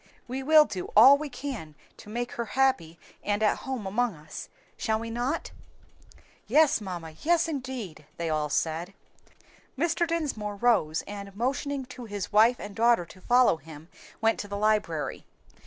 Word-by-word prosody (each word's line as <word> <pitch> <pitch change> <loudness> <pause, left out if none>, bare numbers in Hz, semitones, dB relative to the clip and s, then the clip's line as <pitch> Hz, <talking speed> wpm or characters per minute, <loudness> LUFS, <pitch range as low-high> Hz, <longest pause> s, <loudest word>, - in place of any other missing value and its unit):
We 260 +2 -4
will 305 +2 +6
do 185 -9 -5
all 260 +6 +10
we 295 +1 -4
can 245 - -6 0.2
to - - -13
make 240 +2 -3
her 235 - -3
happy 170 -12 +2 0.3
and 205 +1 0
at 210 - +3
home 260 -6 -5
among 220 +1 0
us, 150 0 -9 0.3
shall 220 -1 -1
we 230 0 -5
not?" 245 +7 -2 1.0
"Yes, 305 -4 +4
mamma, 175 -5 -6
yes 340 +1 +3
indeed!" 255 - -6
they 170 - -2
all 155 -1 0
said. 165 +6 -2 0.8
Mr. 340 +3 +1
Dinsmore 275 -11 -2
rose, 200 -8 +2
and 200 -1 -8
motioning 270 +4 -2
to 250 -1 -10
his 205 -3 -5
wife 225 +4 +5
and 205 -1 -8
daughter 230 -5 +3
to 185 +2 -16
follow 245 -4 +4
him 160 +1 -13 0.3
went 225 0 +2
to 205 - -4
the 200 0 -4
library. 205 -7 0
220 Hz, 160 wpm, -27 LUFS, 185-260 Hz, 1.0 s, all